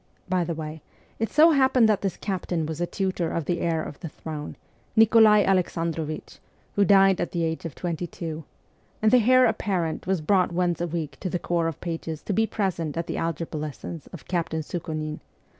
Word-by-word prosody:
By 180 -1 +1
the 170 -1 -3
way, 155 0 -6 0.4
it 225 - 0
so 320 +2 +6
happened 265 -5 +4
that 215 -2 +2
this 195 -2 -2
captain 180 -4 -2
was 160 +1 -4
a 175 - 0
tutor 185 -3 -1
of 165 - -2
the 175 +2 -1
heir 165 -2 0
of 145 - -8
the 165 - -6
throne 150 -1 -7 0.4
(Nikolai 220 -1 +6
Alexandrovich, 165 -4 -1 0.4
who 205 - +4
died 195 -2 +5
at 175 - -3
the 170 -2 0
age 160 +1 -2
of 165 - -5
twenty 175 -1 -3
two), 160 -2 -6 0.6
and 215 0 +3
the 245 -2 +5
heir 255 0 +7
apparent 185 -8 -1
was 190 -2 +1
brought 180 +3 +2
once 175 -1 0
a 175 - 0
week 160 -4 -4
to 185 - -3
the 180 - -1
corps 170 -1 0
of 165 - -4
pages 165 -2 -4
to 205 - -2
be 220 +3 +2
present 170 -8 -2
at 170 - -1
the - - -4
algebra 165 -1 -3
lessons 155 +2 -6
of 175 - -12
Captain 165 -3 -1
Sukhonin. 155 -2 -4
175 Hz, 200 wpm, -25 LUFS, 160-195 Hz, 0.6 s, heir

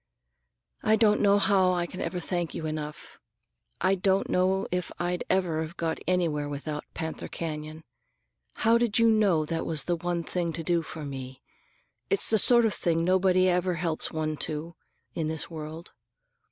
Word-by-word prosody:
"I 215 - +4
don't 210 -1 +3
know 200 0 +5
how 190 -2 +3
I 175 -1 0
can 185 +2 -7
ever 180 - -2
thank 175 -1 -3
you 160 - -4
enough. 150 -1 -6 0.6
I 185 - +3
don't 195 +1 +1
know 190 +1 +2
if 180 -1 -2
I'd 175 0 -1
ever 180 -4 +1
have 160 +2 -6
got 165 -1 -2
anywhere 165 -5 0
without 150 +1 -5
Panther 160 -1 -4
Canyon. 155 -1 -5 0.8
How 230 +1 +5
did 235 -3 +1
you 230 0 +5
know 205 -8 +3
that 165 +1 -2
was 155 -3 -2
the 175 - 0
one 170 0 -2
thing 170 -1 -2
to 165 - -5
do 170 0 +1
for 155 -1 -7
me? 130 -2 -7 0.7
It's 405 - +1
the 220 - +5
sort 235 +2 +6
of 215 - +1
thing 165 -1 0
nobody 185 +1 +3
ever 180 0 +1
helps 165 -1 -2
one 155 -1 -2
to, 155 +3 -4 0.4
in 160 -2 -2
this 160 +1 -3
world. 160 +1 -8
170 Hz, 175 wpm, -27 LUFS, 155-185 Hz, 0.8 s, sort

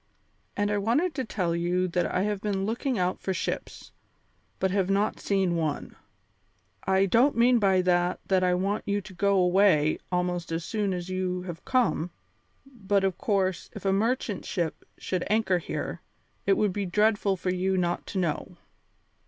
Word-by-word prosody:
And 205 0 +1
I 205 - +1
wanted 285 - +1
to 265 - -2
tell 180 -7 -1
you 175 +2 0
that 175 0 0
I 185 - 0
have 205 -1 -1
been 195 -2 -1
looking 235 +4 -1
out 180 0 0
for 190 - -2
ships, - - -4 0.7
but 190 - 0
have 195 -1 +1
not 200 +2 +1
seen 190 -3 +1
one. 155 -3 -2 0.9
I 190 0 +3
don't 235 +7 +3
mean 240 +1 +5
by 190 -3 +3
that 175 0 +2
that 190 -1 +2
I 180 0 +3
want 195 +3 -1
you 205 0 +1
to 190 0 -12
go 200 +2 +2
away 180 -4 +4
almost 180 -1 -1
as 165 +1 -2
soon 210 -1 -1
as 180 0 -4
you 185 -1 -2
have 175 -3 -7
come, 250 -10 +1 0.6
but 205 -7 -1
of 190 -2 0
course, 190 -4 0
if - - -9
a 195 - +3
merchant 220 -1 0
ship 170 -3 -3
should 185 -2 -2
anchor 210 -4 +2
here, - - -5 0.5
it 195 - +4
would 205 -3 +1
be 200 -1 -2
dreadful 205 0 +2
for 180 +1 -1
you 190 +1 0
not 175 -1 -1
to - - -5
know." 170 -5 -2
190 Hz, 175 wpm, -27 LUFS, 180-205 Hz, 0.9 s, mean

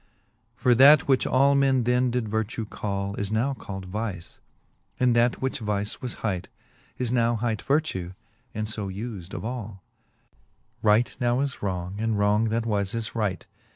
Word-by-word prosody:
IV. - - -33
For 125 - +6
that, 140 +5 +7
which 135 -2 +3
all 140 +2 +4
men 135 -2 +3
then 125 +1 +2
did 120 -2 -1
vertue 110 +1 -2
call, 100 -1 -3
Is 100 0 -2
now 120 +6 +1
cald 95 -7 -7
vice; 100 -2 -5 0.6
and 125 -2 +3
that, 120 +2 +2
which 130 - -1
vice 105 -2 -2
was 125 - -3
bight, 95 -6 -2 0.5
Is 125 -2 -1
now 120 -1 +2
hight 115 -1 -1
vertue, 135 - -1 0.4
and 110 0 -3
fb 105 +1 -5
us'd 90 +2 -10
of - - -5
all; 110 -6 -6 1.0
Right 110 +3 +3
now 120 0 +1
is 140 -2 -3
wrong, 95 -1 -3
and 110 -1 0
wrong 105 +2 +3
that 115 +1 -1
was 100 -2 -1
is 115 -1 -3
right. 105 -7 -2
110 Hz, 170 wpm, -26 LUFS, 100-125 Hz, 1.0 s, that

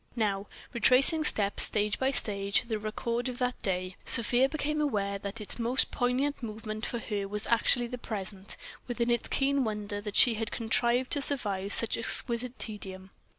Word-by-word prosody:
Now, 205 -3 -2 0.3
retracing 260 +7 +3
stage 210 -2 +4
by 265 - +1
stage 200 -6 0
the 225 -3 -4
record 235 +3 -3
of 245 - -7
the 250 0 -1
day, 185 -1 -2
Sofia 245 +3 +4
became 300 0 -2
aware 200 -8 -2
that 200 +3 -7
its 210 +2 -2
most 240 +3 +1
poignant 260 +4 -1
moment 215 -1 -6
for 235 - -4
her 205 -3 -4
was 210 +1 -3
actually 240 +1 +3
the 250 +1 -7
present, 195 -3 -6 0.3
with 245 -1 -6
its 235 0 0
keen 275 0 0
wonder 210 -2 -4
that 210 -1 -7
she 245 - +6
had 225 0 -4
contrived 240 +2 0
to 285 - +2
survive 205 -9 -2
such 230 +1 +6
exquisite 235 +1 0
tedium. 190 -3 -6
230 Hz, 165 wpm, -28 LUFS, 205-250 Hz, 0.3 s, she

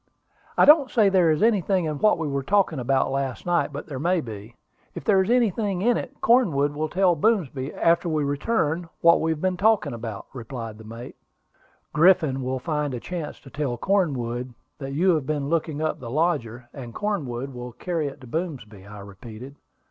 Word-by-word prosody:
"I - - +6
don't 295 -3 +7
say 215 -5 +4
there 185 -4 +4
is 155 +4 +2
anything 195 -5 +2
in 150 -2 -3
what 215 - +4
we 160 -2 -3
were 140 -1 -1
talking 180 -1 +1
about 130 +2 +1
last 135 -2 -3
night, 175 -3 +1
but 145 +1 -6
there 140 -5 -6
may 175 +4 +1
be. 110 -3 -8 0.4
If - - -6
there 195 -3 +4
is 190 - -2
anything 215 -5 +1
in 240 +1 +3
it, - - -6
Cornwood 160 - +3
will 155 +1 -2
tell 180 +1 +3
Boomsby, 150 - 0
after 170 +1 +2
we 155 -2 0
return, 160 +2 -1
what 170 0 +5
we 160 - 0
have 160 -1 -2
been 185 -1 0
talking 200 - +2
about," 115 -3 -6
replied 115 -3 -7
the - - -11
mate. 115 +3 -9 0.8
"Griffin 155 -4 +4
will 130 +1 -2
find 150 -1 -2
a - - -4
chance 170 +2 -6
to 135 - -14
tell 140 -5 -2
Cornwood 125 - -1 0.2
that 135 -1 -5
you 180 +5 +3
have 150 -5 -1
been 145 -2 -2
looking 160 -2 -1
up 155 - -1
the 120 - -7
lodger, 125 -5 -1
and 120 -4 -9
Cornwood 140 - -3
will 125 0 -7
carry 165 +3 -2
it 140 - -8
to 130 - -12
Boomsby," 115 - -5
I 105 0 -10
repeated. 110 +6 -11
150 Hz, 195 wpm, -24 LUFS, 125-180 Hz, 0.8 s, don't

